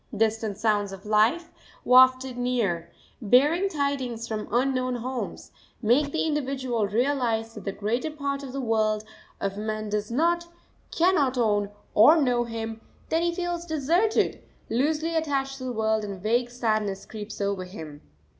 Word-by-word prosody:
Distant 220 -2 0
sounds 210 -2 +1
of 195 +1 -10
life, 220 +11 +2 0.3
wafted 255 0 +5
near, 235 -9 -1 0.3
bearing 295 - +4
tidings 270 -7 -2
from 215 -2 -4
unknown 255 +1 +1
homes, 250 +1 -5 0.3
make 260 +6 +2
the 320 - 0
individual 265 -7 -1
realise 230 -1 0
that 210 -4 -10
the 195 - -1
greater 225 +9 -2
part 280 -2 -3
of 270 -2 -7
the 275 - -4
world 215 -2 +1 0.4
of 195 0 -3
men 215 0 -3
does 210 0 -2
not, 340 +7 +1 0.4
cannot 320 -7 +2
own 205 -4 +2 0.2
or 300 +10 +7
know 245 -4 +2
him; 225 -1 -5 0.3
then 325 - +2
he 345 0 +1
feels 350 0 -3
deserted, 340 +7 +1 0.3
loosely 310 +6 0
attached 275 -4 -1
to 255 - -6
the 255 - -2
world, 220 -1 0
and 200 -1 -4
a - - -11
vague 235 +6 0
sadness 215 -5 -1
creeps 215 -1 -8
over 200 -2 -1
him. 160 -6 -9
245 Hz, 155 wpm, -26 LUFS, 215-280 Hz, 0.4 s, or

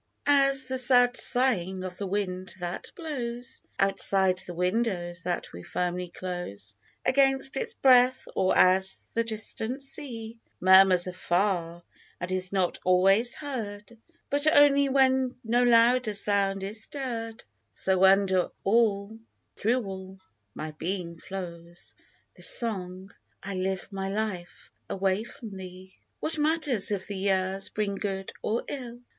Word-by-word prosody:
AS 275 -2 +4
the 260 0 -1
sad 245 -1 +5
sighing 190 -8 0
of 185 -1 -7
the 200 - -3
wind 185 -1 -3
that 175 +1 -5
blows 260 -6 -6 0.2
Outside 195 -1 +3
the 185 -1 -4
windows 180 -2 -1
that 175 0 -3
we 85 - -8
firmly 180 - -3
close 175 - -6 0.3
Against 270 0 +3
its 470 -1 -3
breath, 255 -1 +4
or 185 -1 +2
as 190 +1 +4 0.2
the 230 - +1
distant 225 +3 -4
sea 235 -5 -6 0.2
Murmurs 185 -1 +6
afar, 175 -1 -1 0.4
and 180 +1 -5
is 185 0 -2
not 190 -3 0
always 195 +6 +3
heard 225 -7 -6 0.4
But 290 +2 +1
only 280 -2 +5
when 260 -1 +2
no 240 +2 +2
louder 240 -1 +4
sound 200 -1 +1
is 210 +3 -5
stirr'd, 230 -5 -5 0.3
So, 190 0 +1
under 190 -1 +4
all, 210 0 +1 0.4
through 240 +3 0
all, 190 0 -8 0.4
my 155 0 -5
being 170 +1 -4
flows 175 -2 -8 0.4
This - - +1
song, 190 -4 -1 0.2
" - - -42
I 200 - -5
live 190 0 -2
my 195 -1 -4
life 195 -4 -5 0.2
away 195 +2 0
from 225 -3 -10
thee! 185 0 -10
" - - -49
What 315 -1 -2
matter, 310 -1 +1
if 205 -4 0
the 205 - -6
years 190 0 0
bring 210 -2 -2
good 195 -1 -4
or 225 +3 -1
ill 245 -3 -7
200 Hz, 140 wpm, -27 LUFS, 185-245 Hz, 0.4 s, Murmurs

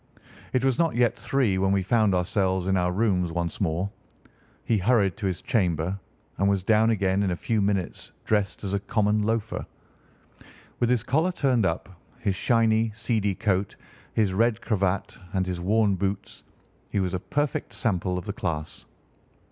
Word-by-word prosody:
It 130 0 +1
was 130 -2 +1
not 165 -5 +2
yet 120 -1 +3
three 125 -9 0
when 95 0 +2
we 100 -1 +2
found 105 -1 +3
ourselves 95 0 0
in 95 0 +1
our 90 -1 +1
rooms 90 -3 +1
once 85 +1 -3
more. 90 +2 0 0.7
He 110 -3 +2
hurried 100 -2 +2
to 100 - -2
his 90 -2 -3
chamber 90 -3 0 0.4
and 100 +1 +3
was 100 -2 +1
down 110 +2 +4
again 100 -3 +1
in 100 - +1
a 90 - 0
few 110 +4 -1
minutes 100 -3 -1
dressed 105 -2 0
as 100 -1 -3
a 100 - +1
common 105 +1 +1
loafer. 110 +1 -1 1.2
With 120 - +2
his 125 -3 +2
collar 155 +9 +1
turned 130 - +2
up, 80 - -2 0.3
his 105 -5 -1
shiny, 115 +1 +2
seedy 105 -3 0
coat, 95 -1 0 0.4
his 105 -4 +1
red 115 +2 +2
cravat, 100 -3 -1
and 95 -1 +1
his 90 -1 -3
worn 105 +2 +3
boots, 95 +2 -3 0.5
he - - -1
was 95 -2 -1
a 90 - -1
perfect 145 +8 -2
sample 90 -4 -1
of 90 - -5
the 100 - -3
class. 80 -6 -4
100 Hz, 170 wpm, -26 LUFS, 95-115 Hz, 1.2 s, down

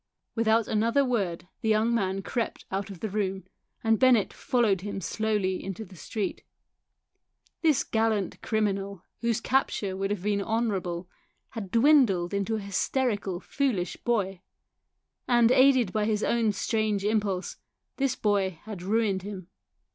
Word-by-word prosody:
I - - -58
Without 225 -1 +2
another 230 +6 +2
word 195 -9 -1
the 220 - 0
young 220 +2 +3
man 195 -3 0
crept 235 +3 -3
out 195 +1 -2
of 190 -4 -10
the 220 - -2
room, 195 -2 -1 0.4
and 225 -1 +3
Bennett 250 -6 +4
followed 230 -8 +1
him 200 0 -4
slowly 205 0 -1
into 195 +3 -5
the 185 - -15
street. 200 +5 -4 1.2
This 310 -5 +3
gallant 220 -4 0
criminal, 200 -3 -1 0.2
whose 235 -1 0
capture 225 -6 0
would 195 +1 -2
have 205 -3 -3
been 205 -1 +1
honourable, 195 -6 -1 0.4
had 215 -6 -6
dwindled 230 - +4 0.2
to 225 - 0
a - - -2
hysterical 200 -1 -1
foolish 225 -7 -1
boy; 195 -6 -1 0.9
and 240 -1 +4
aided 260 -6 +5
by 215 -1 +1
his 215 -1 0
own 230 -2 +2
strange 210 -1 -1
impulse 205 -3 -1 0.4
this 275 -2 +1
boy 195 -4 0
had 210 -4 -7
ruined 200 0 +1
him. 190 -2 -8
210 Hz, 145 wpm, -27 LUFS, 195-230 Hz, 1.2 s, aided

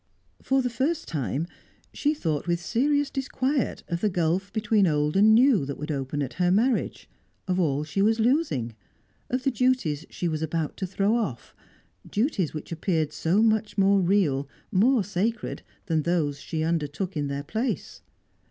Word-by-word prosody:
For 265 0 +1
the 250 - 0
first 290 +8 -1
time, 145 0 -2 0.5
she 300 +1 0
thought 160 - -2
with 170 0 +1
serious 285 +9 +1
disquiet 270 0 -1
of 170 0 -3
the 215 - +2
gulf 180 +2 0
between 210 -2 +2
old 150 0 +1
and 215 +3 +6
new 245 - +5
that 140 0 -5
would 150 +2 -4
open 140 +1 -2
at 130 - -5
her 175 - +4
marriage, 225 +6 +1 0.4
of 185 0 0
all 150 -4 +1
she 155 +6 -2
was 220 +3 +3
losing, 225 - +1 0.6
of 255 +1 -1
the 270 - +2
duties 240 - 0
she 175 - -3
was 155 -2 -2
about 160 -1 -2
to 190 - -3
throw 200 +4 +1
off 165 - -3 0.6
duties 205 - 0
which 155 +1 -7
appeared 160 -2 -1
so 185 +7 +2
much 220 -1 +1
more 195 0 +4
real, 165 -8 +1 0.2
more 225 +4 +4
sacred, 205 +5 -2 0.2
than 160 -4 +1
those 150 -3 0
she 160 -1 -3
undertook 165 +3 -2
in 145 -1 -1
their 140 0 -3
place. 225 - -3
185 Hz, 170 wpm, -26 LUFS, 155-230 Hz, 0.6 s, and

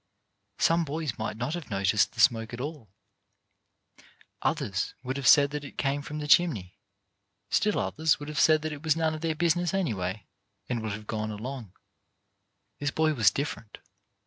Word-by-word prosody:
Some 165 +1 +3
boys 150 -4 -4
might 110 -1 -3
not 125 +6 -2
have 175 -3 -6
noticed 95 -1 +2
the - - -12
smoke 115 0 +3
at - - -10
all; 140 -5 -6 1.5
others 100 0 -1
would 130 +1 -3
have 140 -2 -1
said 140 -1 +7
that 150 0 -4
it 140 - -11
came 140 0 0
from 150 +1 -7
the 150 -1 -4
chimney; 135 - +3 0.7
still 210 0 +2
others 160 0 +1
would 145 - -7
have 150 -3 -3
said 155 +5 +5
that 155 -1 -3
it 145 - -8
was 155 -1 +2
none 160 -1 +1
of 155 - -6
their 165 -1 -1
business 175 +2 +1
anyway, 100 - -2 0.4
and 120 -2 -2
would 110 -2 -3
have 105 +1 -7
gone 110 0 -3
along. 110 -1 -6 1.1
This 145 - 0
boy 155 +1 +1
was 110 -8 +5
different. 115 -3 -5
140 Hz, 175 wpm, -28 LUFS, 110-155 Hz, 1.5 s, said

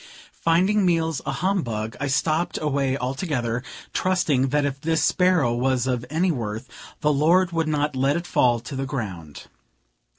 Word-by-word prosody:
Finding 185 +5 +3
meals 165 -4 +1
a - - +1
humbug, 125 - -2
I 145 - -1
stopped 155 +5 0
away 140 -3 0
altogether, 125 -3 -2 0.3
trusting 160 -8 +1
that 145 +2 +1
if 140 -1 -3
this 160 0 +1
sparrow 180 -10 +3
was 130 +1 +1
of 125 -2 -2
any 170 +5 +1
worth, 115 -3 -4 0.3
the 150 0 +3
Lord 170 +5 +3
would 165 -1 0
not 150 -2 0
let 135 +2 +2
it 170 - -5
fall 120 -8 +2
to 135 +4 -7
the 135 0 -3
ground. 95 - -6
145 Hz, 160 wpm, -24 LUFS, 125-165 Hz, 0.3 s, Finding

